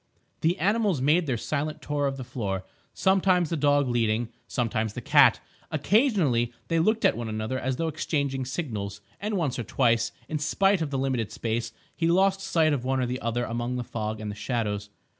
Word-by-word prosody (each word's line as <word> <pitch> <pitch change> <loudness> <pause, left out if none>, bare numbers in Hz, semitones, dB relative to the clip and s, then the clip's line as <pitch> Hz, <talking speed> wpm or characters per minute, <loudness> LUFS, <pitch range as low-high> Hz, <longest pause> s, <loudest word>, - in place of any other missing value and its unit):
The 170 +4 +1
animals 200 - +2
made 155 +5 +3
their 125 -3 0
silent 150 +5 -2
tour 145 -1 -1
of 135 0 -3
the 130 - -5
floor, 100 -7 -3 0.3
sometimes 185 -3 +2
the - - +1
dog 145 -2 +3
leading, 115 -1 +1 0.2
sometimes 110 -3 -1
the - - -5
cat; - - +5 0.3
occasionally 180 - +2 0.2
they 165 -1 +2
looked 220 +7 +2
at - - +4
one 115 -1 -4
another 110 +4 -2
as 130 0 -1
though 165 +5 -1
exchanging 140 -4 -1
signals; 110 - -4 0.2
and 210 0 -2
once 145 -8 -1
or - - -1
twice, 115 +1 +2 0.2
in 155 - -2
spite 195 +5 +2
of 155 - -1
the 140 - -2
limited 130 -5 -1
space, 115 0 -2 0.2
he 165 - 0
lost 190 +3 +3
sight 165 -5 +2
of 130 -4 -2
one 130 +1 0
or 125 - 0
other 115 +1 -1
among 120 +2 -2
the 125 - -2
fog 110 -2 -4
and 105 -1 -4
the - - -7
shadows. 105 -2 -2
130 Hz, 195 wpm, -27 LUFS, 115-165 Hz, 0.3 s, cat